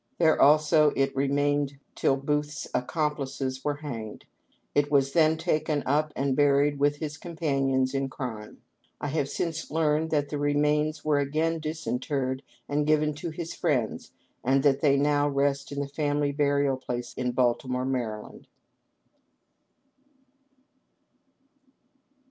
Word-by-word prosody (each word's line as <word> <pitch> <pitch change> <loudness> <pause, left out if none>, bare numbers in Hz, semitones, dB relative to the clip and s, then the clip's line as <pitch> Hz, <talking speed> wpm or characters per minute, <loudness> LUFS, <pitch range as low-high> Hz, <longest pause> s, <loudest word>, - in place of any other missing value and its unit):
There 160 -2 +3
also 150 +1 +5
it 135 0 0
remained 140 +1 +1 0.2
till 135 - +2
Booth's 150 +1 -2
accomplices 135 -1 -2
were 145 -1 0
hanged. 120 -8 -7 0.5
It 145 0 +2
was 135 -1 +3
then 160 -1 +4
taken 155 -3 0
up 150 +3 +1
and 135 -1 0
buried 145 0 +3
with 145 +1 +3
his 150 -1 -5
companions 135 -6 0
in 135 0 -1
crime. 115 -6 -7 0.4
I 145 - -3
have 140 -1 -1
since 165 -1 -3
learned 160 0 +1
that 145 -2 0
the 145 - -3
remains 150 +1 +1
were 150 -2 +3
again 155 +4 0
disinterred 140 -4 -2 0.3
and 145 +1 0
given 155 0 +2
to 170 +4 -5
his 165 +1 -6
friends, 130 -10 -1 0.3
and 135 +2 +2
that 140 -1 +3
they 140 -2 +4
now 145 +1 +2
rest 140 0 0
in 140 - -4
the 140 - -3
family 145 0 0
burial 140 -1 +1
place 125 -2 -5
in 125 -1 -2
Baltimore, 125 +1 0
Md." 120 -5 -4
145 Hz, 130 wpm, -27 LUFS, 135-150 Hz, 0.5 s, also